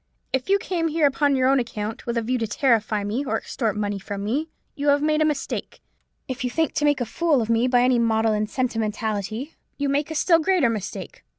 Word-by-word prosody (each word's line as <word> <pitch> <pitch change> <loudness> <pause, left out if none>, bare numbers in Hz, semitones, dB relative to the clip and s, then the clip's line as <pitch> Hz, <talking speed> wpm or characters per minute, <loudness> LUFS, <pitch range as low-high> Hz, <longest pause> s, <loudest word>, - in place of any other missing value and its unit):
If 265 +6 -1
you 395 - +5
came 350 -4 -1
here 315 -1 +2
upon 285 0 +2
your 260 -1 +2
own 270 0 +4
account, 220 -2 -5
with 235 0 -1
a 230 - 0
view 250 +2 -1
to 225 - -1
terrify 220 -3 +1
me, 215 +7 -2
or 275 - -3
to - - -24
extort 220 -5 -2
money 205 -1 -2
from 200 +1 -6
me, 280 +10 -1 0.2
you 290 -1 -3
have 285 0 +4
made 305 0 +2
a - - +4
mistake. 300 -3 -3 0.5
If 260 0 -4
you 250 - 0
think 320 +5 0
to 295 - 0
make 290 -3 +2
a - - +1
fool 310 +4 +1
of 225 -1 -1
me 230 +2 +3
by 245 -1 +4
any 250 -1 +3
maudlin 220 -2 +1
sentimentality, 220 +1 -2 0.2
you 285 -1 -1
make 285 +2 0
a 315 - -5
still 335 +2 +4
greater 330 -7 +2
mistake. 195 -3 -6
250 Hz, 230 wpm, -24 LUFS, 220-290 Hz, 0.5 s, you